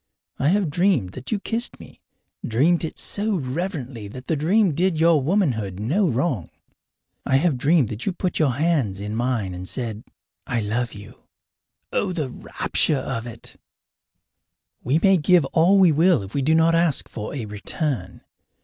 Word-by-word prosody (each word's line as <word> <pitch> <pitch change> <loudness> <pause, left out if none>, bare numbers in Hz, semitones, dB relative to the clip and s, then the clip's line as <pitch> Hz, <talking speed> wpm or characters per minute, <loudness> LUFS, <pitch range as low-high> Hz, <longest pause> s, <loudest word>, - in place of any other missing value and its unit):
I 140 - +1
have 185 -2 +2
dreamed 175 - +1
that 130 +5 -8
you 215 - 0
kissed 230 +4 -3
me - - -14 0.4
dreamed 155 +11 +2
it 160 - -5
so 210 +1 -1
reverently 135 - -4
that 125 +5 -10
the 160 - 0
dream 180 +5 +2
did 175 +1 +1
your 165 -2 +4
womanhood 130 - 0
no 165 - +1
wrong. 125 - -1 0.7
I 135 - +1
have 150 +1 +3
dreamed 140 -1 +2
that 110 +1 -6
you - - +2
put 180 0 -3
your 145 -6 +2
hands 140 - 0
in 105 +2 -4
mine 115 -6 -1
and 90 +1 -7
said, 115 -4 -4 0.4
"I 120 - -1
love 115 +3 -2
you." 100 0 -12 0.7
Oh, 190 -2 0
the 150 -7 -3
rapture 145 - 0
of 125 -3 -4
it! 115 -1 -9 1.3
We 135 +5 +2
may 195 +2 +4
give 170 0 +4
all 175 +4 +5
we 185 -4 +6
will 165 - +3
if 95 - -10
we 140 - 0
do 155 +4 +3
not 165 +1 +4
ask 165 -4 +1
for 110 +5 -6
a 125 -5 -4
return. 105 - -4
145 Hz, 170 wpm, -23 LUFS, 115-175 Hz, 1.3 s, we